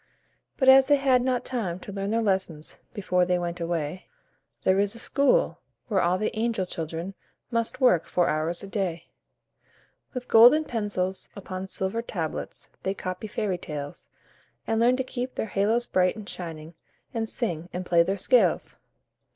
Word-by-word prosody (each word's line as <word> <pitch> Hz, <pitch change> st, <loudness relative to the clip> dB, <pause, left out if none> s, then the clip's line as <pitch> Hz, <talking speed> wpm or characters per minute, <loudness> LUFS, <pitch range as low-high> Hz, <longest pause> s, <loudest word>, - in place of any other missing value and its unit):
But 265 Hz, -, +1 dB
as 265 Hz, 0 st, +8 dB
they 290 Hz, -, +6 dB
had 270 Hz, -3 st, +3 dB
not 255 Hz, -1 st, 0 dB
time 200 Hz, -9 st, -2 dB
to 200 Hz, -, -8 dB
learn 195 Hz, 0 st, -3 dB
their 225 Hz, +1 st, +1 dB
lessons 190 Hz, -6 st, -2 dB
Before 180 Hz, -3 st, +1 dB
they 180 Hz, 0 st, +2 dB
went 175 Hz, 0 st, -3 dB
away, 170 Hz, 0 st, -3 dB, 0.6 s
There 190 Hz, +1 st, +3 dB
is 200 Hz, +2 st, +1 dB
a -, -, -8 dB
school, 280 Hz, -, +2 dB, 0.3 s
where 195 Hz, -4 st, +2 dB
all 175 Hz, +2 st, +2 dB
the 215 Hz, +3 st, -2 dB
angel 220 Hz, -3 st, 0 dB
children 165 Hz, +2 st, -5 dB, 0.4 s
Must 230 Hz, -1 st, -1 dB
work 245 Hz, -, +4 dB
four 175 Hz, -1 st, +2 dB
hours 160 Hz, +4 st, -1 dB
a -, -, -7 dB
day. 185 Hz, -5 st, -3 dB, 1.1 s
With 250 Hz, 0 st, -5 dB
golden 245 Hz, +8 st, +7 dB
pencils 200 Hz, -6 st, -2 dB
upon 190 Hz, -1 st, -6 dB
silver 190 Hz, +4 st, -2 dB
tablets, 170 Hz, -9 st, -5 dB
They 190 Hz, +1 st, -2 dB
copy 185 Hz, +3 st, -5 dB
fairy 205 Hz, -3 st, -2 dB
tales, 145 Hz, -3 st, -7 dB, 0.6 s
And 225 Hz, -, 0 dB
learn 245 Hz, +2 st, +4 dB
to 260 Hz, -, 0 dB
keep 255 Hz, 0 st, -5 dB
their -, -, -1 dB
halos 220 Hz, +5 st, +2 dB
bright 185 Hz, -2 st, +2 dB
and 215 Hz, -2 st, -9 dB
shining, 165 Hz, -3 st, -7 dB, 0.4 s
And 225 Hz, -2 st, -2 dB
sing, 175 Hz, -8 st, -3 dB
and 180 Hz, +1 st, -4 dB
play 170 Hz, -1 st, +4 dB
their 195 Hz, +4 st, 0 dB
scales. 245 Hz, +6 st, +2 dB
195 Hz, 165 wpm, -26 LUFS, 175-230 Hz, 1.1 s, as